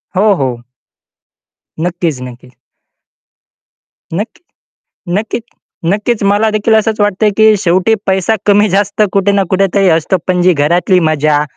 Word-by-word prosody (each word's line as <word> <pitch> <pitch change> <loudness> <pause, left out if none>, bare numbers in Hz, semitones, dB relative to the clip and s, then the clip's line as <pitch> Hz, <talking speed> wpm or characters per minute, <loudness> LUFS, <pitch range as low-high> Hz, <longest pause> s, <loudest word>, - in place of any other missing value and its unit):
हो, 205 +2 +3
हो. 125 -5 -3 1.2
नक्कीच, 170 -5 -2
नक्कीच. 125 0 -11 1.6
नक्क 215 - -4 0.8
नक्कीच 220 +2 -4 0.5
नक्कीच 210 +1 -1
मला 215 +2 +2
देखील 215 +1 +1
असंच 220 0 0
वाटतंय, 205 +1 +1
की 220 -1 +5
शेवटी 185 +4 +2
पैसा 190 +3 +1
कमी 205 +1 +4
जास्त 205 +2 0
कुठे 200 0 +1
ना 200 -1 +2
कुठेतरी 195 0 +2
असतो. 165 +3 +1
पण 180 -1 +1
जी 180 0 +4
घरातली 170 +5 +1
मजा 150 -1 +1
195 Hz, 125 wpm, -13 LUFS, 170-210 Hz, 1.6 s, की